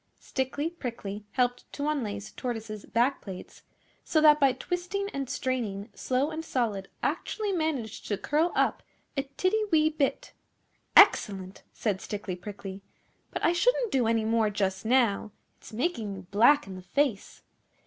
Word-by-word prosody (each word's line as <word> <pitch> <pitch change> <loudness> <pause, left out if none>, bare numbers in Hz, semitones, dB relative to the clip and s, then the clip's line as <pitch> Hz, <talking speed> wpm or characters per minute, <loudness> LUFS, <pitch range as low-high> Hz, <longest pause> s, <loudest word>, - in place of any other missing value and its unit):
Stickly 280 +4 -2
Prickly 215 - -6
helped 245 -1 0
to 285 +1 -2
unlace 215 -9 -2
Tortoise's 225 -4 -5
back 245 +5 +1
plates, 190 -3 -9 0.4
so 315 - +2
that 300 -1 +7
by 275 -2 +5
twisting 355 +9 -3
and 275 -2 -3
straining 225 -5 -2
Slow 265 +4 0
and 320 +1 -4
Solid 220 -10 -1 0.2
actually 425 -2 -1
managed 310 - -2
to 205 - 0
curl 305 - +1
up - - +2 0.3
a 275 -1 -1
tiddy 405 +4 +2
wee 310 -1 +4
bit. 295 -3 -1 0.6
'Excellent!' 190 -2 +5
said 200 -4 -2
Stickly 200 -3 -4
Prickly; 195 +1 -8 0.5
'but - - -2
I 340 - +4
shouldn't 475 +5 +2
do 250 -4 +2
any 225 -1 +2
more 225 -1 +2
just 190 -1 -1
now. 230 -4 +3 0.3
It's - - -13
making 225 - -2
you 190 - -8
black 245 +8 +5
in 195 - -8
the 185 - -8
face. 220 +3 -1
245 Hz, 150 wpm, -28 LUFS, 205-300 Hz, 0.6 s, that